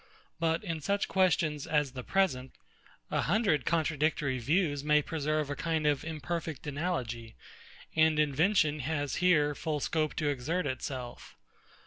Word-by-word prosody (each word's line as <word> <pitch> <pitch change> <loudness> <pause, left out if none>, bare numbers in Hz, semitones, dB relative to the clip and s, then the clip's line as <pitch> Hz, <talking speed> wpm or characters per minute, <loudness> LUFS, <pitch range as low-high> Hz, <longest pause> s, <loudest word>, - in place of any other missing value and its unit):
But 165 +1 +1
in 165 -5 -4
such 200 +7 0
questions 160 -6 +1
as 150 -3 +1
the 130 0 -6
present, 135 -10 0 0.6
a - - +1
hundred 195 - +1
contradictory 155 -4 +1
views 145 +2 +1
may 150 0 +3
preserve 155 -1 -1
a - - -2
kind 160 -1 -1
of 145 -2 +2
imperfect 160 0 -4
analogy; 130 - -3 0.6
and 160 -1 +4
invention 150 +1 +2
has 145 +1 -2
here 155 -5 +3
full 150 0 -2
scope 155 +1 -1
to 155 - -1
exert 145 +6 -1
itself. 130 -2 -5
155 Hz, 135 wpm, -30 LUFS, 145-165 Hz, 0.6 s, and